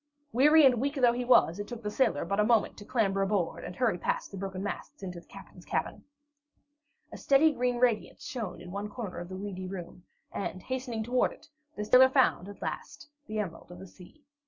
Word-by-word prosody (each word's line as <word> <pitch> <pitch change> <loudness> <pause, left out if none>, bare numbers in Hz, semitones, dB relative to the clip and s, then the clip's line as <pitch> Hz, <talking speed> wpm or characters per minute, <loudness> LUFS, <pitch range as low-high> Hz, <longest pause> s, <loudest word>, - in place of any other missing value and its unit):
Weary 300 +5 +6
and 250 -3 +4
weak 280 +2 -1
though 245 -4 +4
he 245 +1 -2
was, 205 -7 +4
it 205 - -4
took 235 -2 -8
the 210 - -3
sailor 255 +1 +1
but 200 +1 -1
a - - +5
moment 225 0 +2
to 205 - -10
clamber 200 -4 +1
aboard, 195 -3 -1
and 180 - -7
hurry 225 -8 +1
past - - -2
the 195 - -7
broken 195 0 -5
masts 200 -1 -6
into 180 -2 -6
the - - -20
captain's - - -13
cabin. - - -3 1.1
A - - -8
steady, 290 +3 +4
green 250 -3 0
radiance 240 -3 0
shone 220 -11 -5
in 175 +1 -10
one 200 +2 -4
corner 210 -4 -6
of 175 0 -7
the 185 - -6
weedy 190 -2 -5
room, 180 -1 -8 0.3
and 185 -2 -4
hastening 250 -4 -3
toward 245 +3 +1
it, - - -19 0.3
the 210 - -4
sailor 255 +4 +7
found, 260 -8 +2
at 205 - -10
last, - - -6 0.2
the 215 0 -4
Emerald 180 -4 -5
of 175 - -10
the 190 - -10
Sea. 190 - -16
210 Hz, 215 wpm, -29 LUFS, 190-250 Hz, 1.1 s, sailor